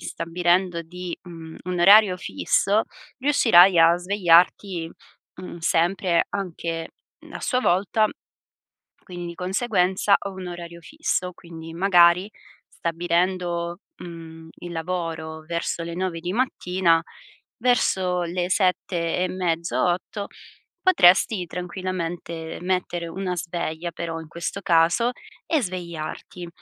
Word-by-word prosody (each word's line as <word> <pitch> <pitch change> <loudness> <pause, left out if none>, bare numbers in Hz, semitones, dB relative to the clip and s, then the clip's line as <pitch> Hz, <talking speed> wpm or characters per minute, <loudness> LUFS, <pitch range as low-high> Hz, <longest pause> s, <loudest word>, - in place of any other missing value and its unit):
stabilendo 175 +1 0
di 180 +1 -7
mhmm, 165 -2 -10
un 180 0 -2
orario 200 +1 +7
fisso, 200 +3 +1 0.3
riuscirai 195 -10 +5
a 165 +1 +6
svegliarti, 180 -1 +2 0.5
mhmm, 180 -1 -8
sempre, 170 +2 +1
anche 170 -4 -4 0.4
a - - -7
sua 250 - 0
volta. 205 +1 +2 1.0
Quindi, 175 -1 -8
di 170 - -7
conseguenza, 190 0 +1
ho 200 - -6
un 190 -1 -8
orario 170 -1 -8
fisso, 185 - -2
quindi 165 -1 -11
magari 180 +1 +4 0.4
stabilendo, 175 0 -1 0.2
mhmm, 165 -1 -10
il 175 0 -8
lavoro 165 -2 -4
verso 170 0 -3
le 170 0 -5
9:00 180 -2 -3
di 175 +2 -3
mattina, 185 -7 +1 0.6
verso 190 -7 +1
le 175 +1 -2
7 180 -3 0
e 180 0 +1
mezzo, 170 -2 -1
8, 185 +3 -2 0.5
potresti 190 - +4
tranquillamente 175 -2 -5
mettere 175 -1 -2
una 180 +1 -4
sveglia 170 0 -4
però 165 0 -5
in 160 - -10
questo 170 +4 -5
caso, 175 +7 +3 0.3
e 315 -4 +1
svegliarti, 175 -2 -6
175 Hz, 115 wpm, -24 LUFS, 170-185 Hz, 1.0 s, orario